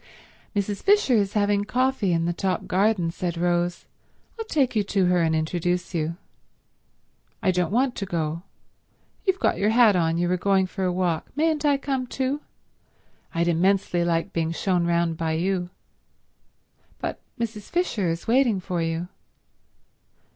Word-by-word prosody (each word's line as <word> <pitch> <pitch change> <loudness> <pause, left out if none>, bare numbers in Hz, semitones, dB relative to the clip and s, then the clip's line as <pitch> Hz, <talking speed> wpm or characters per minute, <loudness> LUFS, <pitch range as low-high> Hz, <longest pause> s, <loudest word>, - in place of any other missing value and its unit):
"Mrs. 200 0 -1
Fisher 405 -9 +4
is 200 -4 +2
having 205 -1 +2
coffee 250 -3 +1
in 165 -1 +1
the 175 - 0
top 190 +2 -1
garden," 190 -2 +1
said 175 0 -3
Rose. 175 0 0 0.5
"I'll 450 - -3
take 275 - +1
you 210 - +3
to 195 -1 +1
her 180 -1 +3
and 160 -1 +2
introduce 175 +3 -1
you." 165 0 -2 1.3
"I 190 - +4
don't 180 -1 0
want 250 +3 +2
to 195 - -3
go. 165 -2 -2 0.9
You've 380 0 +3
got - - +1
your 205 - +2
hat 225 -3 +5
on, 165 -2 +2
so 170 - 0
you 175 - +1
were 180 +1 +1
going 195 +1 +2
for 190 +1 -5
a 180 - +1
walk. 175 -3 -1
Mayn't 310 0 +1
I 285 -1 +4
come 270 -2 -2
too? 270 +3 -2 0.9
I'd 170 +1 +1
immensely 175 +1 +2
like 165 -1 0
being 165 -1 0
shown 175 0 0
round 170 -1 +1
by 160 -1 -1
you." 175 +2 -1 1.3
"But - - -4 0.2
Mrs. 220 -3 -4
Fisher 240 - 0
is 165 +1 -3
waiting 235 -4 +3
for 180 -2 -3
you." 165 +1 -2
185 Hz, 160 wpm, -25 LUFS, 170-220 Hz, 1.3 s, hat